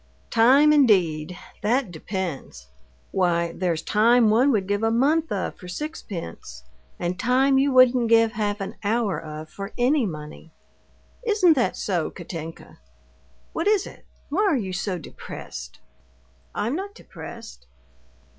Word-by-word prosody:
"Time, 270 +7 +6
indeed, 180 - +3 0.2
that 230 0 +1
depends! 165 - -5 0.5
Why, 170 -2 +1
there's 170 -2 -2
time 225 +1 +4
one 250 +6 +4
would 200 -6 0
give 205 +1 0
a 225 - +2
month 295 +8 +2
of 195 - -2
for 180 - -10
sixpence, 175 - -7 0.3
and 175 +1 -3
time 265 +3 +3
you 280 +1 +2
wouldn't 255 -2 +5
give 225 -1 +5
half 210 -2 -2
an 195 - -6
hour 205 -5 0
of 155 0 -8
for 195 +1 -7
any 255 0 +2
money. 155 -1 -8 0.7
Isn't 410 -7 +4
that 255 -5 0
so, 175 -5 -1
Katinka? 165 -2 -9 0.7
What 330 +4 -1
is 415 -2 +3
it? - - -12 0.3
why 330 +8 0
are 380 -9 +3
you 190 -6 -4
so 185 0 -2
depressed?" - - -9 0.8
"I'm 235 +7 -1
not 400 +3 -5
depressed." 230 - -11
215 Hz, 135 wpm, -24 LUFS, 175-260 Hz, 0.8 s, Time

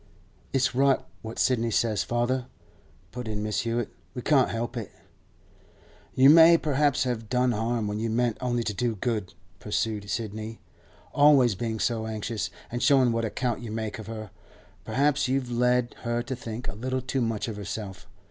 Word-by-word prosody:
'It's 135 -1 +1
right 135 +1 +3 0.2
what 110 +1 -7
Sidney 115 -3 +2
says, 110 -1 +1
father,' 120 +1 -1 0.6
put 125 -1 -6
in 105 -1 -3
Mrs. 105 0 -1
Hewett; 115 0 -1 0.3
'we 125 - -5
can't 135 -4 +4
help 120 +2 -3
it.' 115 -4 -4 1.3
'You 130 +1 +6
may 165 +1 +8
perhaps 145 -2 +1
have 115 -4 -3
done 125 0 +2
harm 115 0 -1
when 105 +1 -3
you 115 +1 -1
meant 120 0 +1
only 120 -2 0
to 105 - -2
do 120 +2 -1
good,' 105 -4 -3 0.2
pursued 105 -1 -2
Sidney. 110 0 -4 0.5
'Always 140 -5 +6
being 110 +2 -3
so 110 -1 0
anxious, 110 -1 -3 0.2
and 120 +1 -3
showing 130 -3 +5
what 115 0 0
account 120 +2 -2
you 120 - -6
make 110 0 -4
of 110 - -8
her, 110 -3 -7 0.5
perhaps 145 +1 +1
you've 130 -1 -1
led 125 0 +2
her 120 0 -2
to 130 +2 -4
think 120 0 -6
a - - -3
little 130 +5 -3
too 130 +1 -1
much 115 -2 -1
of 110 - -4
herself. 100 -1 -6
120 Hz, 175 wpm, -27 LUFS, 110-125 Hz, 1.3 s, may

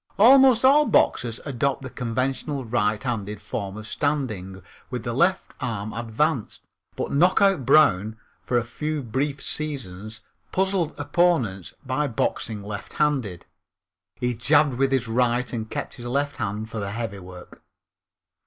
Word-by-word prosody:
Almost 260 +2 +7
all 290 +3 +6
boxers 115 -1 +2
adopt 140 0 -1
the 130 - -6
conventional 130 +3 -2
righthanded 105 -2 -1
form 100 -1 -5
of 110 - -8
standing 110 - -2 0.3
with 125 -3 -4
the 120 - -3
left 180 +8 +1
arm 110 -5 -3
advanced, 120 +3 -1 0.3
but - - -3
Knockout 180 -1 +3
Brown, 110 -8 +4 0.3
for 125 - 0
a 120 - +1
few 150 +5 -4
brief 135 +4 -2
seasons, 110 -8 -5 0.3
puzzled 190 -4 0
opponents 145 - +1
by 135 +3 0
boxing 110 -3 -2
lefthanded. 105 0 -2 0.7
He 125 +1 -1
jabbed 145 +4 +3
with 135 0 +2
his 130 -3 +1
right 120 +2 +1
and 110 -2 -4
kept - - -4
his 120 -1 -8
left 140 +3 -1
hand 105 +2 -3
for 110 -2 -4
heavy 105 -2 -4
work. 90 -1 -12
125 Hz, 135 wpm, -24 LUFS, 110-145 Hz, 0.7 s, Almost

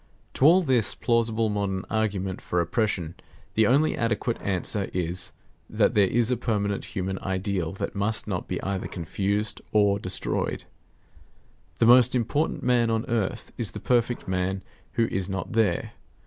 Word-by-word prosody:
To 135 - +2
all 180 +4 +7
this 130 -7 +2
plausible 115 -2 +1
modern 100 -2 -2
argument 100 -3 -1
for 90 - -1
oppression, 85 -2 -1 0.4
the 110 -1 +3
only 145 +5 +3
adequate 115 0 -1
answer 100 +1 0
is, 90 0 -2 0.4
that - - +2
there 100 -2 +4
is 120 +4 +2
a 125 - +1
permanent 100 -4 -1
human 95 0 -2
ideal 95 -3 -2
that 95 - -4
must 105 +2 -1
not 90 -4 -3
be 90 - -3
either 95 -1 -2
confused 100 +5 -2
or 100 -1 +3
destroyed. 95 -2 -2 1.1
The - - +3
most 125 +1 +7
important 125 +6 0
man 120 -2 +3
on 115 0 0
earth 115 -6 -2
is - - -2
the - - -5
perfect 120 -1 0
man 95 +1 -1 0.3
who 115 - +2
is 95 0 -2
not 95 +4 -4
there. 110 -6 +1
105 Hz, 155 wpm, -26 LUFS, 95-115 Hz, 1.1 s, all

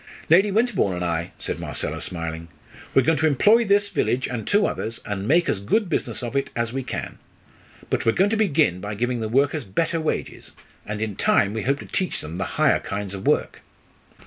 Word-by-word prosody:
"Lady 195 +5 +6
Winterbourne 205 - +1
and 90 0 -2
I," 85 +1 -2
said - - -4
Marcella, 80 +2 -3
smiling. 85 -2 -5 0.5
"We're 135 - +6
going 160 +2 +2
to 160 - +3
employ 210 - +4
this 200 0 +3
village 130 +2 0
and 120 -3 -5
two 205 0 +3
others, 115 +2 -3
and 100 0 -3
make 170 +5 +4
as 100 - 0
good 180 - 0
business 150 - -2
of 120 +2 -5
it 140 - 0
as 115 0 -1
we 135 - -1
can. - - -6 0.7
But - - +1
we're 115 - +3
going 195 +3 +2
to - - +2
begin 155 - +2
by 105 +1 -4
giving 120 +3 -1
the 110 -1 -3
workers 140 +4 +2
better 165 - -1
wages, 155 - -4 0.3
and 105 +1 -3
in 105 -3 -4
time 100 +1 +3
we 110 - -2
hope 135 +5 +1
to - - -9
teach 185 - -2
them 80 +4 -7
the - - -1
higher - - +4
kinds 100 -1 -5
of 100 -1 -6
work." - - +1
120 Hz, 210 wpm, -23 LUFS, 100-165 Hz, 0.7 s, Lady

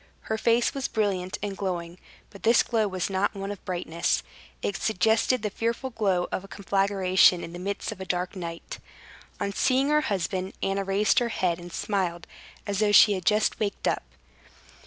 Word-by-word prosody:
Her 220 - -2
face 235 +1 +2
was 275 -1 -2
brilliant 190 -4 -1
and 200 -1 -3
glowing; 175 -2 -4 0.3
but 200 - -13
this 230 +1 +5
glow 220 -3 +1
was 185 -2 -2
not 195 +1 0
one 195 0 -4
of 205 - -8
brightness; 175 -2 -1 0.4
it 200 - -1
suggested 220 +4 +2
the 210 - -1
fearful 235 +5 -2
glow 195 -6 +1
of 190 - -2
a - - -11
conflagration 195 -2 +3
in 165 - -7
the 175 - -7
midst 200 +4 -3
of 200 -3 -8
a - - -4
dark 180 +1 -2
night. 170 -2 -6 0.6
On 200 - -2
seeing 265 +5 +2
her 300 0 +4
husband, 190 - -2
Anna 195 0 0
raised 195 +2 +3
her 240 -1 -1
head 180 -6 0
and 175 0 -10
smiled, 180 -4 -2 0.4
as 200 -1 -2
though 210 -1 +3
she 205 0 +8
had 185 -3 -4
just 215 0 +2
waked 205 -2 -2
up. - - +1
195 Hz, 185 wpm, -26 LUFS, 185-215 Hz, 0.6 s, she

